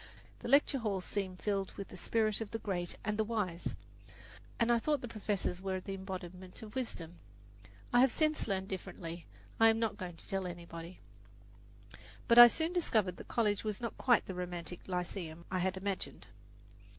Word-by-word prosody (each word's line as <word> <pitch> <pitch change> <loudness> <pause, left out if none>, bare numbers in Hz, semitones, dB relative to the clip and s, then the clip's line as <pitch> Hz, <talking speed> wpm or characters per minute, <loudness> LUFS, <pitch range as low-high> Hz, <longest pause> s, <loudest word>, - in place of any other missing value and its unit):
The - - -6
lecture 280 +1 +5
halls 200 -5 -1
seemed 190 -3 -3
filled 195 -2 0
with 200 - -7
the - - -10
spirit 215 +3 +1
of 220 - -3
the 225 - -3
great 180 -5 -2
and 210 0 -1
the - - +5
wise, 205 -6 -2 0.8
and 235 0 +4
I 235 - +5
thought 295 +2 +1
the 245 - -4
professors 205 -5 -2
were 190 -1 -1
the 195 +1 -6
embodiment 185 0 -7
of 215 -1 -9
wisdom. 180 -10 -5 0.4
If 105 - -19 0.2
I 245 - +7
have 260 0 +6
since 310 -1 +1
learned 190 -2 -1
differently, 170 -3 -6 0.3
I 225 0 +8
am 225 - +3
not 225 -2 0
going 180 -4 -6
to - - -9
tell 195 -2 -1
anybody. 170 0 -8 1.3
But 235 0 +8
I 240 - +14
soon 320 +7 0
discovered 215 - +1
that - - -10
college 210 -4 +1
was 215 -2 -2
not 235 -1 -4
quite 245 -3 +4
the 190 - -5
romantic 180 -1 -5
lyceum 175 -2 -4
I 185 - +1
had 190 +1 0
imagined. 195 0 -4
195 Hz, 185 wpm, -34 LUFS, 180-225 Hz, 1.3 s, I